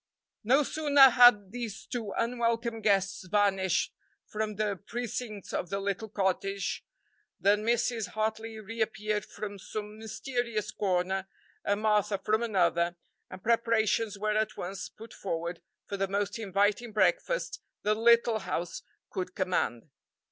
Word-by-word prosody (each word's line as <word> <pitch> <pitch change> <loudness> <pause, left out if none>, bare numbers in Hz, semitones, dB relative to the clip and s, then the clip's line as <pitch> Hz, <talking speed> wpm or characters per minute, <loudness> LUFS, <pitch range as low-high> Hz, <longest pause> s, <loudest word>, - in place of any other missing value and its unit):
No 265 +7 +4
sooner 285 -2 +6
had 235 -6 +7
these 235 -4 -5
two 230 -5 -4
unwelcome 230 -1 0
guests 195 -2 +1
vanished 195 -2 +2 0.3
from 215 0 -3
the 210 -1 0
precincts 235 -3 -5
of 175 - -2
the 200 - -1
little 200 +2 -3
cottage 195 0 -1 0.6
than 205 +2 +3
Mrs. 235 -1 +1
Hartley 220 +1 -2
reappeared 215 -1 -2
from 205 -1 -7
some 210 +2 -6
mysterious 225 -1 -3
corner 190 -1 0 0.4
and 205 +1 0
Martha 210 -1 +2
from 215 +3 +1
another, 175 -6 +2 0.3
and 185 0 -10
preparations 225 -2 +2
were 210 +1 0
at 215 0 0
once 190 +2 -5
put 225 +1 -13
forward 170 -2 -4 0.2
for 200 - -4
the 195 0 0
most 200 +2 -1
inviting 205 +3 +1
breakfast 210 - +1 0.2
the 210 - +3
little 230 0 +4
house 170 -3 -3 0.3
could 185 -1 -4
command. 160 - -1
210 Hz, 130 wpm, -29 LUFS, 195-225 Hz, 0.6 s, had